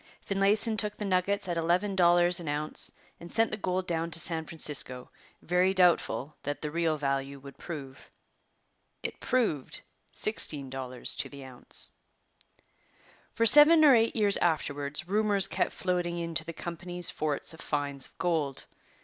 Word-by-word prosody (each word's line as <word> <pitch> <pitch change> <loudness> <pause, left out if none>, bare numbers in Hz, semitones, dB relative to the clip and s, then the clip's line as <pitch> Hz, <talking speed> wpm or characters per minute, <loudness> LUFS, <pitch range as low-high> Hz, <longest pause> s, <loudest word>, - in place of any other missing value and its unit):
Finlayson 205 +3 +1
took 210 -1 -3
the 210 - -4
nuggets 195 +1 0
at 175 -1 -2
eleven 180 +5 0
dollars 175 -1 +4
an 170 - -8
ounce 150 +1 +1 0.3
and 170 - -11
sent 225 0 +3
the - - -1
gold 185 -2 -2
down 165 -1 -2
to 165 0 +3
San 160 -1 +1
Francisco, 140 -6 -3 0.3
very 180 +2 +1
doubtful 165 -7 +2
what 145 0 -4
the 150 - -4
real 165 -1 0
value 140 -1 -2
would 140 +1 -12
prove. 140 -6 -9 0.9
It - - -6
proved 225 - -1 0.3
sixteen 145 -10 +1
dollars 130 -2 -5
to - - -2
the 140 -1 -11
ounce. 125 -2 -3 1.4
For 230 - +2
seven 305 +5 +8
or 285 - +7
eight 230 -1 +2
years 205 -2 +3
afterwards 145 -2 -2
rumours 205 -1 +2
kept - - -1
floating 175 -2 -2
in 170 -1 -4
to 160 - -1
the 170 - -6
company's 175 +1 0
forts 155 +1 -2
of 160 - -12
finds 140 -2 -2
of - - -23
gold. 160 -6 -2
170 Hz, 160 wpm, -28 LUFS, 145-195 Hz, 1.4 s, seven